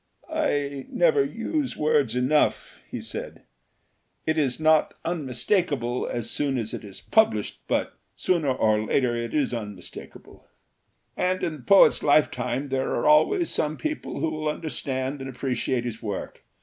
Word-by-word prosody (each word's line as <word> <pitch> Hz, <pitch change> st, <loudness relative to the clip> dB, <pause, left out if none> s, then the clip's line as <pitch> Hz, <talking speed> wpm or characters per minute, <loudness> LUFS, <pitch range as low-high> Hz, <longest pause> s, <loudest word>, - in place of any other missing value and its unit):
"I 145 Hz, -, -1 dB
never 470 Hz, -4 st, +3 dB
use 300 Hz, -8 st, -2 dB
words 150 Hz, -6 st, +2 dB
enough," 130 Hz, +4 st, +1 dB
he -, -, -5 dB
said. -, -, -7 dB, 0.8 s
"It 155 Hz, -, +1 dB
is 140 Hz, -4 st, +1 dB
not 155 Hz, -1 st, +3 dB
unmis 145 Hz, -8 st, -3 dB
takable 140 Hz, -, 0 dB
as 120 Hz, -2 st, -3 dB
soon 140 Hz, -3 st, 0 dB
as 110 Hz, -2 st, -3 dB
it -, -, -5 dB
is 100 Hz, -2 st, -9 dB
published, 215 Hz, -, +2 dB
but -, -, 0 dB, 0.2 s
sooner 170 Hz, -6 st, +1 dB
or 110 Hz, -4 st, +2 dB
later 120 Hz, +1 st, +1 dB
it 120 Hz, +1 st, -3 dB
is 145 Hz, -4 st, +1 dB
unmistakable. 105 Hz, -6 st, -9 dB, 0.7 s
"And 185 Hz, 0 st, 0 dB
in 165 Hz, -, 0 dB
the -, -, -14 dB
poet's 195 Hz, +10 st, +6 dB
lifetime 145 Hz, -2 st, +2 dB
there 135 Hz, 0 st, -1 dB
are -, -, -1 dB
always 155 Hz, -, +4 dB
some 155 Hz, 0 st, -1 dB
people 310 Hz, 0 st, -4 dB
who 160 Hz, -, 0 dB
will 155 Hz, 0 st, -2 dB
understand 135 Hz, -2 st, -3 dB
and 135 Hz, -, -5 dB
appreciate 125 Hz, -1 st, -2 dB
his 115 Hz, -2 st, -5 dB
work. 105 Hz, -4 st, -5 dB
140 Hz, 150 wpm, -25 LUFS, 125-155 Hz, 0.8 s, poet's